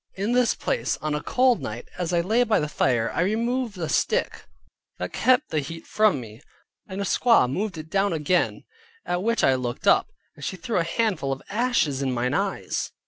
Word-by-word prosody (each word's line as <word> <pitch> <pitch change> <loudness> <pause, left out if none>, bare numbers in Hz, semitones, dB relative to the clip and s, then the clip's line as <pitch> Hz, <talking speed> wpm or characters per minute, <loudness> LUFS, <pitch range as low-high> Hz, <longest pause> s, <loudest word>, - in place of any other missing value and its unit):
In 200 +4 -1
this 245 -1 +3
place, - - -1
on 155 0 -2
a 150 - -1
cold 255 -2 +2
night, 110 +3 -6
as 180 -1 -3
I 170 -1 +2
lay 220 +8 +2
by 225 -3 +2
the 150 - -1
fire, 120 -5 +1
I - - 0
removed 230 +3 -1
a 165 -3 -3
stick 145 - 0 0.5
that 90 0 -5
kept 255 +4 +2
the 155 - +1
heat 165 +3 -7
from 215 -9 +2
me. 110 0 -11 0.5
A 190 - -6
squaw 230 - +4
moved 185 +7 -3
it 155 0 -9
down 195 0 +2
again, 165 +3 0 0.4
at 175 0 -1
which 230 +3 0
I 135 - +5
looked 125 -2 -3
up, - - +5 0.3
and 145 - -12
she 190 - -3
threw 185 +5 -2
a 170 - +3
handful 170 -5 -1
of 135 - -4
ashes 210 - +1
in 135 -1 0
mine 125 +1 -1
eyes. - - -2
175 Hz, 200 wpm, -25 LUFS, 140-225 Hz, 0.5 s, I